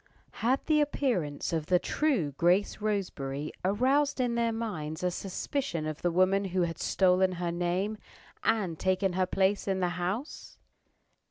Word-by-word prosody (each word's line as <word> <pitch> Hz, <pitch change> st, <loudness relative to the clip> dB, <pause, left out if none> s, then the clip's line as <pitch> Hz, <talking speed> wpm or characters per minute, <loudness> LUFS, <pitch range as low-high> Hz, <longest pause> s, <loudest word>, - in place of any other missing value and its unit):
Had 255 Hz, +4 st, +1 dB
the 305 Hz, -2 st, +3 dB
appearance 195 Hz, -, -1 dB
of 160 Hz, -2 st, -1 dB
the 180 Hz, -, +4 dB
true 230 Hz, -, 0 dB
Grace 175 Hz, +10 st, +2 dB
Roseberry 155 Hz, -9 st, -2 dB
aroused 265 Hz, +9 st, +2 dB
in 245 Hz, -2 st, +1 dB
their 235 Hz, -1 st, +1 dB
minds 180 Hz, -9 st, -4 dB
a 180 Hz, -, +1 dB
suspicion 190 Hz, -, -3 dB
of 155 Hz, 0 st, -4 dB
the 175 Hz, -, +2 dB
woman 185 Hz, +3 st, +3 dB
who 185 Hz, -1 st, 0 dB
had 165 Hz, -1 st, -3 dB
stolen 185 Hz, 0 st, +3 dB
her 175 Hz, -1 st, -2 dB
name, 180 Hz, +5 st, -1 dB, 0.4 s
and 195 Hz, -8 st, 0 dB
taken 185 Hz, 0 st, +1 dB
her 185 Hz, 0 st, +1 dB
place 195 Hz, +2 st, +1 dB
in 190 Hz, -1 st, 0 dB
the 180 Hz, -1 st, +1 dB
house? 180 Hz, -, -4 dB
185 Hz, 155 wpm, -29 LUFS, 175-225 Hz, 0.4 s, the